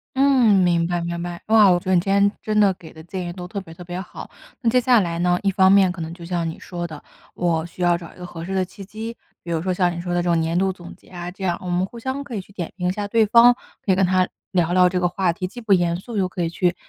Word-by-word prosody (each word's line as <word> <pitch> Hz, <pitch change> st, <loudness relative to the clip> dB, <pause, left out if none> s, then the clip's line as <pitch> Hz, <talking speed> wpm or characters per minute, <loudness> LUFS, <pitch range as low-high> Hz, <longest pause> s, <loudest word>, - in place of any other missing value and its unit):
嗯， 265 Hz, -5 st, +4 dB
明 170 Hz, -1 st, +2 dB
白 175 Hz, 0 st, -1 dB
明 170 Hz, 0 st, -3 dB
白。 175 Hz, 0 st, -6 dB
哇， 215 Hz, -2 st, +6 dB
我 175 Hz, -, +3 dB
觉 -, -, -21 dB
得 185 Hz, 0 st, +2 dB
你 175 Hz, -, +4 dB
今 195 Hz, +2 st, 0 dB
天 200 Hz, 0 st, +4 dB
真 215 Hz, -1 st, +1 dB
的 205 Hz, -2 st, +5 dB
给 165 Hz, -2 st, -14 dB
的 160 Hz, -, -12 dB
建 180 Hz, +1 st, -5 dB
议 175 Hz, -, -5 dB
都 180 Hz, 0 st, -8 dB
特 200 Hz, +1 st, -5 dB
别 165 Hz, -4 st, -11 dB
特 175 Hz, -, -11 dB
别 175 Hz, +1 st, -6 dB
好。 190 Hz, -, -9 dB, 0.3 s
那 235 Hz, -, +2 dB
接 250 Hz, +2 st, +4 dB
下 245 Hz, -1 st, +4 dB
来 170 Hz, -4 st, -1 dB
呢， 180 Hz, 0 st, +2 dB
一 200 Hz, -, +1 dB
方 190 Hz, -1 st, +4 dB
面 195 Hz, -2 st, +5 dB
可 180 Hz, -1 st, -7 dB
能 160 Hz, +1 st, -5 dB
就 170 Hz, 0 st, -11 dB
像 170 Hz, -1 st, -2 dB
你 160 Hz, -, -6 dB
说 175 Hz, -1 st, -6 dB
的， 155 Hz, -3 st, -9 dB, 0.3 s
我 165 Hz, -2 st, 0 dB
需 170 Hz, +1 st, -11 dB
要 175 Hz, -1 st, +3 dB
找 170 Hz, -1 st, -11 dB
一 -, -, -21 dB
个 180 Hz, -, -7 dB
合 165 Hz, -1 st, -8 dB
适 190 Hz, -, -5 dB
的 190 Hz, -1 st, +1 dB
契 185 Hz, +2 st, -10 dB
机， 220 Hz, +3 st, -7 dB, 0.2 s
比 170 Hz, -, -10 dB
如 165 Hz, -, 0 dB
说 185 Hz, +2 st, -1 dB
像 180 Hz, -1 st, +1 dB
你 -, -, -5 dB
说 175 Hz, 0 st, -3 dB
的 175 Hz, -, +1 dB
这 175 Hz, -, -1 dB
种 170 Hz, -1 st, +3 dB
年 165 Hz, +1 st, 0 dB
度 190 Hz, 0 st, +1 dB
总 175 Hz, -2 st, -11 dB
结 -, -, -25 dB
啊， 175 Hz, -1 st, -7 dB
这 195 Hz, +1 st, -10 dB
样 175 Hz, -2 st, 0 dB
我 -, -, -6 dB
们 175 Hz, +1 st, +1 dB
互 235 Hz, -, -12 dB
相 265 Hz, +4 st, -3 dB
可 250 Hz, -4 st, -7 dB
以 200 Hz, -, -3 dB
去 200 Hz, -, -20 dB
点 175 Hz, -4 st, -5 dB
评 180 Hz, -1 st, -1 dB
一 -, -, +1 dB
下 205 Hz, +2 st, -4 dB
对 220 Hz, +1 st, +3 dB
方。 235 Hz, +3 st, +6 dB, 0.3 s
可 195 Hz, -, +1 dB
以 -, -, +4 dB
跟 190 Hz, 0 st, +3 dB
他 185 Hz, 0 st, +2 dB, 0.2 s
聊 175 Hz, -3 st, +1 dB
聊 180 Hz, 0 st, +5 dB
这 180 Hz, 0 st, 0 dB
个 180 Hz, -, +2 dB
话 180 Hz, 0 st, 0 dB
题， 185 Hz, +2 st, -4 dB
既 225 Hz, +7 st, -10 dB
不 220 Hz, -3 st, +2 dB
严 175 Hz, -2 st, +2 dB
肃 225 Hz, +5 st, -9 dB
又 190 Hz, -3 st, 0 dB
可 180 Hz, -1 st, -3 dB
以 165 Hz, -, -1 dB
去 175 Hz, +1 st, 0 dB
180 Hz, 345 characters per minute, -22 LUFS, 175-200 Hz, 0.3 s, 哇